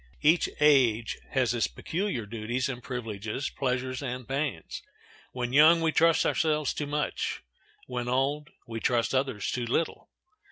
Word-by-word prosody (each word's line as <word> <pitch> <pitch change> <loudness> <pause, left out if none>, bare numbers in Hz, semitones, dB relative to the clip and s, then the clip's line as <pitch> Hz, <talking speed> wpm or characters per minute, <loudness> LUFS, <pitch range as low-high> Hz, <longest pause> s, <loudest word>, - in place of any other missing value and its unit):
Each 160 +3 +4
age 125 -7 +3
has 125 -4 +1
its 120 - +1
peculiar 170 - -3
duties 115 +4 -2
and 125 -2 -5
privileges, 115 0 -4
pleasures 130 0 -2
and 125 -2 -5
pains. 135 - -3 0.5
When 125 -1 -3
young 155 +4 +7
we 165 -1 +1
trust 165 +1 +4
ourselves 155 -3 +1
too 145 - -3
much; 150 +1 -2 0.4
when 125 -1 -4
old 140 +4 0 0.2
we 115 -1 -5
trust 120 +1 +1
others 130 -6 0
too 120 -2 -2
little. 160 +7 -1
130 Hz, 145 wpm, -28 LUFS, 120-150 Hz, 0.5 s, young